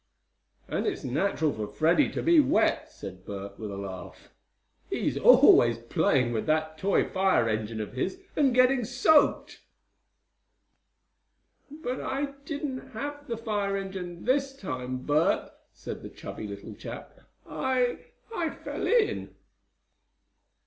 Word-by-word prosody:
"And - - -2
it's - - -2
natural 155 +3 0
for 105 -1 -4
Freddie 160 - +2
to - - -3
be 335 -1 +6
wet;" 295 - +2
said 95 -1 -9
Bert, 100 0 -7
with 110 -2 -5
a 100 - -6
laugh. 95 -2 -8 0.6
"He's - - -1
always 120 -1 +7
playing 120 +1 +1
with 110 - -2
that 155 0 +1
toy 195 +4 +2
fire 190 -11 +2
engine 110 0 -2
of 105 - -5
his, 135 - -2 0.2
and 280 -3 +3
getting 255 +1 +4
soaked." 260 +6 +3 2.1
"But 280 -4 -5
I 275 +1 -2
didn't 275 -3 -5
have 290 +5 -6
the 230 - -3
fire 205 -3 -1
engine 185 -3 -6
this 270 +2 +1
time, 130 - -5
Bert," 150 +3 +2 0.2
said - - -8
the - - -8
chubby 110 - -8
little 100 0 -8
chap. - - -9 0.3
"I 255 -2 0 0.4
I 335 -4 0
fell - - -5
in!" 455 -2 +1
195 Hz, 130 wpm, -28 LUFS, -, 2.1 s, always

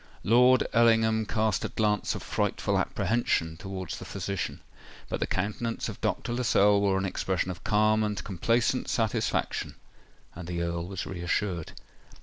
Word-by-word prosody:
Lord 125 +3 +5
Ellingham 115 -2 +4
cast 110 -2 0
a - - -2
glance 105 -1 0
of - - -6
frightful - - 0
apprehension 85 -8 0
towards 95 0 -6
the - - -8
physician; 100 -4 -4 0.5
but - - -2
the - - -1
countenance 105 +4 -2
of - - -8
Dr. 120 - -1
Lascelles 105 -4 +3
wore 100 -1 +2
an 95 - -1
expression 95 -1 -1
of 90 - -9
calm 110 +1 +3
and 105 -1 -2
complacent 115 +6 0
satisfaction—and 100 -5 -3
the 85 -1 -2
Earl 85 0 -3
was 95 -1 -5
reassured. 90 -1 -2
105 Hz, 140 wpm, -28 LUFS, 90-110 Hz, 0.5 s, Lord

